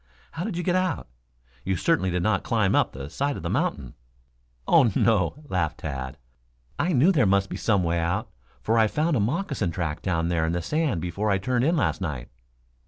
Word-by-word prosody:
"How 165 - -4
did 190 -3 -3
you 175 - -2
get 180 - +1
out? 185 - 0 0.6
You 95 0 0
certainly 150 - +1
did 90 0 -1
not 110 -1 +2
climb 110 -4 +1
up - - +3
the 70 +1 -7
side 140 - -2
of - - -8
the - - -2
mountain." 65 -3 -1 0.7
"Oh, 140 -10 +5
no," 115 - +1
laughed 80 - -1
Tad. 65 -3 -5 0.6
"I 180 - +1
knew 155 +5 +5
there 140 - +3
must 100 0 +2
be - - -3
some 100 -5 +1
way 85 0 0
out, 85 +1 -1 0.4
for 115 +1 +2
I 110 - +5
found 155 +7 0
a - - +2
moccasin 130 - -1
track 80 -3 -3
down 85 -3 0
there 85 -2 +1
in 80 +1 0
the 85 - -1
sand 150 - 0
before 95 +5 -2
I 100 - +3
turned 120 +6 0
in 165 +3 +2
last 140 - 0
night." 75 -9 -4
100 Hz, 210 wpm, -25 LUFS, 85-140 Hz, 0.7 s, Oh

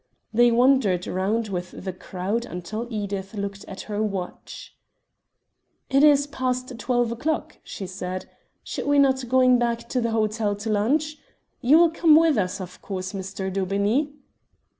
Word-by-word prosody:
They 240 +2 +5
wandered 235 -7 +3
round 210 +4 -1
with 180 -1 -5
the 190 - -3
crowd 190 +5 -3
until 215 +6 -5
Edith 200 -2 -4
looked 200 -1 -4
at 190 - -7
her 210 0 -3
watch. 195 -4 -5 1.2
"It 275 +2 +4
is 285 -2 +6
past 255 -3 -3
twelve 240 0 +1
o'clock," 300 +7 -3
she 195 - -7
said. 185 0 -5 0.4
"Should - - -5
we 285 0 +3
not 265 -2 +4
be 250 - -7
going 255 0 +4
back 235 -1 -1
to 250 - 0
the 230 - 0
hotel 215 -1 0
to 205 +2 -5
lunch? 295 +9 +1 0.4
You 275 +4 +6
will 335 -1 +5
come 330 -2 +5
with 320 -5 +4
us, 185 +1 -2
of 180 -1 -9
course, 185 -1 -5
Mr. 190 0 -4
Daubeney?" 200 +9 0
220 Hz, 160 wpm, -24 LUFS, 195-260 Hz, 1.2 s, is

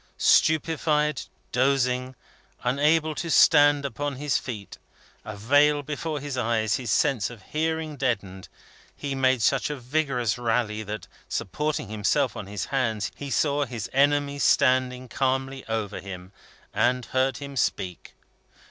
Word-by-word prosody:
Stupefied, 150 -2 +2 0.3
dozing, 130 0 +1 0.5
unable 150 +5 +2
to 170 +2 -4
stand 145 -2 +5
upon 145 +1 -3
his 145 +1 0
feet, 105 -6 -8 0.4
a 110 -1 -7
veil 145 +7 +3
before 150 +1 -4
his 140 -2 -4
eyes, 110 -2 +1
his 125 -3 -6
sense 110 +1 +2
of 115 -5 -12
hearing 160 -1 -1
deadened, 100 -8 -2 0.5
he 140 -1 -4
made 130 -3 +2
such 135 +4 +2
a 150 - -3
vigorous 125 -4 -1
rally 115 -2 0
that, 105 0 -6 0.2
supporting 150 +5 -2
himself 105 -1 0
on - - -6
his 100 -1 -4
hands, 115 -6 0
he 145 - -7
saw 145 +3 +1
his 120 -6 -6
enemy 145 +1 +2
standing 130 -2 +2
calmly 135 +1 -1
over 110 -3 -3
him, 90 -1 -9 0.4
and 125 0 +1
heard 130 -1 +1
him 140 -1 -8
speak. 90 -8 -2
130 Hz, 135 wpm, -25 LUFS, 115-145 Hz, 0.5 s, stand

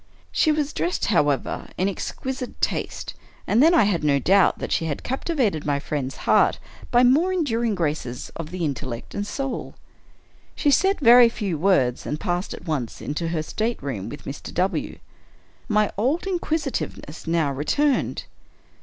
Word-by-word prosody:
She 315 - +3
was 300 -1 -1
dressed, 350 - -1
however, 145 -8 +1
in 185 - +1
exquisite 255 +6 -5
taste - - -2 0.2
— - - -29
and 220 +4 +3
then 330 +4 +6
I 320 - +6
had 195 -6 0
no 145 -2 +3
doubt 190 +8 +4
that - - -5
she 165 - +1
had 145 -3 -3
captivated 255 - -1
my 145 -1 0
friend's 140 -2 -3
heart - - +4 0.3
by 245 +1 +4
the 245 - +6
more 325 +7 +3
endur 285 -11 0
ing 225 -3 +1
graces 150 -8 -3
of 165 -2 -6
the 180 -1 -3
intellect 130 -4 -5
and 205 0 -3
soul. 275 +2 -4 0.8
She 290 - +2
said 385 +8 +3
very 240 -1 +8
few 205 -6 -3
words, 145 -8 +2
and 150 - -3
passed 175 +1 -2
at - - -13
once 145 -8 -3
into 150 +3 -3
her 165 -2 -1
stateroom 140 - -3
with 145 - -9
Mr. 140 - -7
W. 185 +3 -1 0.7
My 210 -3 +2
old 275 - +1
inquisitiveness 300 - -3
now 165 -3 +1
returned. 265 - 0
190 Hz, 165 wpm, -23 LUFS, -, 0.8 s, very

